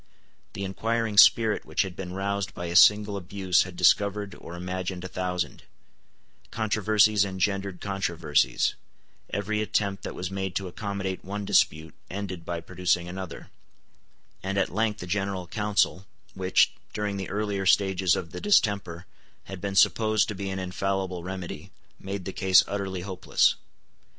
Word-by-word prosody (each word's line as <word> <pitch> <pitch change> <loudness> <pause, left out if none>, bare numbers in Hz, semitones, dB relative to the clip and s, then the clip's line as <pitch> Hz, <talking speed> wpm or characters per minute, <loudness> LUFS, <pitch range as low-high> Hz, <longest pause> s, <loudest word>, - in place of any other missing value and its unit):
The 100 - -5
inquiring 110 +2 0
spirit 110 -1 +6
which - - 0
had 95 -2 -7
been 90 -1 -6
roused 100 0 -2
by 90 - -5
a 85 0 -4
single 105 +2 +6
abuse 95 -1 +1
had 90 -1 -9
discovered 100 +3 +2
or 85 - -10
imagined 90 0 -4
a - - -4
thousand: 90 -1 -3 0.9
controversies 110 -1 +3
engendered 100 -1 -2
controversies: 85 -10 0 0.6
every 105 +2 -1
attempt 100 -2 -1
that - - -6
was 90 0 -4
made 95 -2 -3
to 95 - -2
accommodate 95 0 -4
one 100 +1 -5
dispute 80 -3 +2 0.2
ended 95 -3 -5
by 85 -1 -3
producing 85 0 0
another; 95 0 -7 0.9
and 95 +1 -3
at 95 -3 0
length 105 -1 0
a - - -5
General 95 0 -2
Council, 105 0 0 0.3
which, 95 -1 +3 0.2
during 105 -1 -2
the 95 - -5
earlier 100 -1 -2
stages 95 -1 +3
of 85 -3 -5
the - - -7
distemper, 100 - +1 0.4
had 95 -2 -9
been 100 -1 -3
supposed 110 +1 +4
to - - -2
be 100 0 -5
an 95 - -3
infallible 95 0 -2
remedy, 95 -1 -6 0.3
made 95 -1 -5
the 95 - -5
case 95 -1 +5
utterly 95 -2 -3
hopeless. 95 -1 +2
95 Hz, 150 wpm, -26 LUFS, 90-100 Hz, 0.9 s, spirit